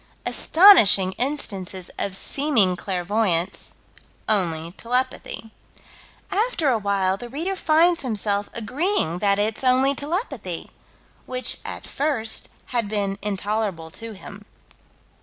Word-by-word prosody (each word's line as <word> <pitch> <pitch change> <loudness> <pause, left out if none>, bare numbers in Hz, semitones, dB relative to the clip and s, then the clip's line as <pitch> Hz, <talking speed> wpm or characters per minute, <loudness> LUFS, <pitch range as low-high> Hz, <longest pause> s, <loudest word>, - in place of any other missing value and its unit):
Astonishing 230 - +6
instances 195 -9 -2
of 195 -2 -2
seeming 230 -7 +2
clairvoyance 185 -1 -1 0.5
"only 170 -5 0
telepathy." 245 +1 -3 0.8
After 410 - +1
a 235 -4 +2
while 195 -2 0
the 240 +3 -9
reader 330 +9 -3
finds 335 0 +3
himself 205 -4 -1
agreeing 235 - -1
that 200 0 +2
it's 215 +4 -1
only 260 +2 +3
telepathy 330 - -4 0.6
which, 255 0 -1
at - - -6
first, 270 -7 -1 0.2
had 230 -4 0
been 200 -2 -2
intolerable 200 -4 -2
to 225 +4 -8
him. 205 +1 -12
220 Hz, 105 wpm, -23 LUFS, 195-275 Hz, 0.8 s, Astonishing